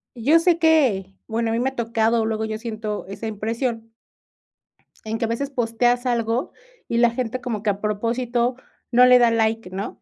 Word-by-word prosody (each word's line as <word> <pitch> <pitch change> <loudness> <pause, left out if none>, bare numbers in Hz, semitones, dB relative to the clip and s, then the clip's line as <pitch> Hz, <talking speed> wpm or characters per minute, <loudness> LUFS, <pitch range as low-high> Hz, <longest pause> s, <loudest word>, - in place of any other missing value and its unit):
yo 280 +8 +4
sé 335 0 +3
que, 260 - +2
bueno, 225 0 -1
a - - 0
mí 230 - 0
me 255 +2 +1
ha 265 - -16
tocado, 230 -1 +1
luego 220 0 -2
yo 215 0 -4
siento 215 -2 -5
esa 200 +3 -6
impresión 225 +2 -3 1.1
en 220 +1 -3
que 230 - -1
a - - -6
veces 270 +5 -2
posteas 245 0 0
algo 235 0 -1 0.4
y 235 - 0
la 240 0 +5
gente 250 +1 -3
como 230 -5 -4
que 215 - +1
a 200 0 -3
propósito 235 +3 -1 0.4
no 245 +1 +7
le 250 0 +7
da 240 -1 +4
like, 225 -3 0
¿no? 195 +2 -6
230 Hz, 190 wpm, -22 LUFS, 220-245 Hz, 1.1 s, no